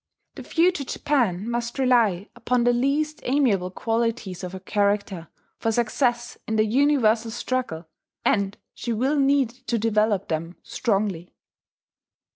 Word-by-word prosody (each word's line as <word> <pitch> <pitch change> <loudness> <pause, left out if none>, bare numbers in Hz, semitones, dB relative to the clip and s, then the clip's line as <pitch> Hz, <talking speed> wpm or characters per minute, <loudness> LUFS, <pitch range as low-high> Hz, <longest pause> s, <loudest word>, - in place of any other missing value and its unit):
The - - -9
future 340 -2 +1
Japan 235 -9 0
must 235 +1 -3
rely 230 -7 +2
upon 240 +1 0
the 245 0 +4
least 285 +5 0
amiable 240 -9 +1
qualities 225 -3 -2
of 180 0 -5
her 190 - -6
character 200 -3 -1 0.3
for 225 - 0
success 240 +1 0
in 220 - -1
the 215 0 +3
universal 235 -2 +2
struggle; 225 -8 -3 0.4
and 200 -1 +1 0.2
she 235 - -3
will 265 +6 +1
need 275 -3 +3 0.2
to 235 - +1
develop 215 -2 +1
them 165 +2 -3
strongly. 195 -6 -2
230 Hz, 130 wpm, -24 LUFS, 200-255 Hz, 0.4 s, the